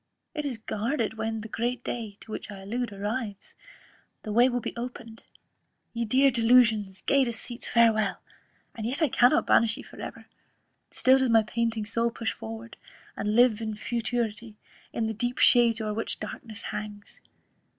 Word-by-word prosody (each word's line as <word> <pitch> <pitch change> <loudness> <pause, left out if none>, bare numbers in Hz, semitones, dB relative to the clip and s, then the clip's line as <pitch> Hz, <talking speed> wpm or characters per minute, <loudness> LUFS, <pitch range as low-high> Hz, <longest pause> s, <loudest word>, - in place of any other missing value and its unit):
it 300 -2 -3
is 260 -5 -2
guarded, 225 +2 -2
when 220 0 -3
the 220 - -7
great 240 +2 -2
day, 220 -4 -5
to 220 - -12
which - - -6
I 200 -2 -8
allude, 235 +4 -3
arrives, 205 +1 -4 0.7
the 215 - -5
way 240 +3 +6
will 245 - -1
again 245 - -4
be - - -28
opened. 235 -2 -7 0.7
Ye 235 0 -1
dear 265 +5 +4
delusions, 225 -5 +3
gay 275 -1 +3
deceits, 235 0 -4
farewel! 220 -4 +3 0.6
and 225 -1 -4
yet 275 +7 -1
I 305 - +3
cannot 245 +7 +4
banish 230 -1 +4
ye - - -8
for - - -12
ever; - - -8 0.6
still 260 +1 +4
does 260 -1 +2
my 225 -1 +5
panting 225 0 -1
soul 230 +2 +1
push 230 -3 -3
forward, 110 +1 -8 0.4
and 210 +1 -1
live 240 -2 +5
in 220 -1 -3
futurity, 230 -1 -3 0.4
in 230 - -1
the 220 - -1
deep 240 +3 -2
shades 235 -2 +5
o'er 215 -1 -2
which 225 +2 -3
darkness 215 0 -7
hangs. 210 -1 -7
230 Hz, 170 wpm, -27 LUFS, 215-245 Hz, 0.7 s, way